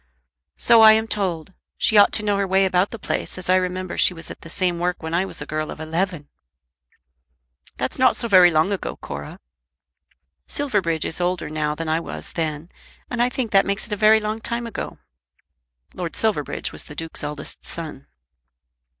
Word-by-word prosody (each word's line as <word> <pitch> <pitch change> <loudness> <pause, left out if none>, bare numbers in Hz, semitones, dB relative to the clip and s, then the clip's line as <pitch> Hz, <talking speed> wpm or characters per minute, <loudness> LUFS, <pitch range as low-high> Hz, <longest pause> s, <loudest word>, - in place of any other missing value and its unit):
"So 230 -1 +6
I 220 0 +10
am 220 0 +2
told. 190 -4 -2 0.2
She 220 - +2
ought 205 -1 +7
to 210 - +2
know 205 -1 +1
her 200 -1 0
way 190 +1 +3
about 185 +1 +2
the 230 - -7
place, 205 - -3
as 185 0 -2
I - - +6
remember 185 0 -3
she 180 - +4
was 165 - -8
at - - -11
the 165 - -11
same 175 0 -1
work 175 -1 -2
when 160 0 -4
I 180 +3 +2
was 170 - -4
a - - -10
girl 155 0 -3
of - - -8
eleven." 165 -1 -2 1.5
"That's - - -2
not 255 - +5
so 235 - -1
very 185 -4 +7
long 160 +4 +2
ago, 200 - -3
Cora." - - -8 1.1
"Silverbridge 195 - 0
is 165 - -3
older 175 -3 -1
now 150 -1 -1
than 165 +1 -5
I 160 +1 +1
was - - -6
then, 160 0 -3 0.4
and 240 -1 -1
I 245 - +3
think 250 -3 -3
that 195 -1 +5
makes 200 +1 0
it 210 - -5
a - - +1
very 215 +2 +5
long 215 +1 -3
time 235 +1 -2
ago." 230 - -6 1.0
Lord 175 -2 -5
Silverbridge 205 -10 0
was - - -5
the 150 - -11
Duke's 165 0 -4
eldest 150 0 -6
son. 155 -5 -8
185 Hz, 195 wpm, -22 LUFS, 160-210 Hz, 1.5 s, I